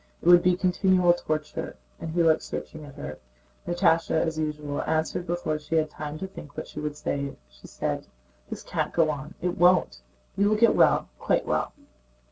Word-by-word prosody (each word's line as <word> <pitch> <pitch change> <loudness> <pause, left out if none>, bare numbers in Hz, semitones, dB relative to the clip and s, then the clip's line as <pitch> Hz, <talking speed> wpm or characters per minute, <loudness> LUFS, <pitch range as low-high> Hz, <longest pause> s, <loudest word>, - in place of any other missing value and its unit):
It - - -15
would 175 0 +8
be 180 0 +3
continual 180 -1 +3
torture." 155 -3 -4 0.2
And 165 - -5
he 170 +1 +1
looked 160 -1 +4
searchingly 155 -2 -7
at 140 - -13
her. 145 - -7 0.5
Natásha 175 -2 +2
as 160 0 0
usual 150 -2 -3
answered 160 +2 -1
before 165 -3 -1
she 150 +2 -4
had 155 -1 +1
time 150 0 -6
to 190 - -5
think 150 -6 -12
what - - -5
she - - -8
would 150 -1 -4
say. 140 -2 -3
She - - -15
said: - - -3 0.4
"This - - -6
can't - - -2
go 160 -2 +3
on—it 160 +5 -5
won't. 175 - +4 0.3
You 200 +1 +3
will 215 - +2
get 230 0 +5
well—quite - - +2
well." - - -1
160 Hz, 180 wpm, -26 LUFS, 150-175 Hz, 0.5 s, would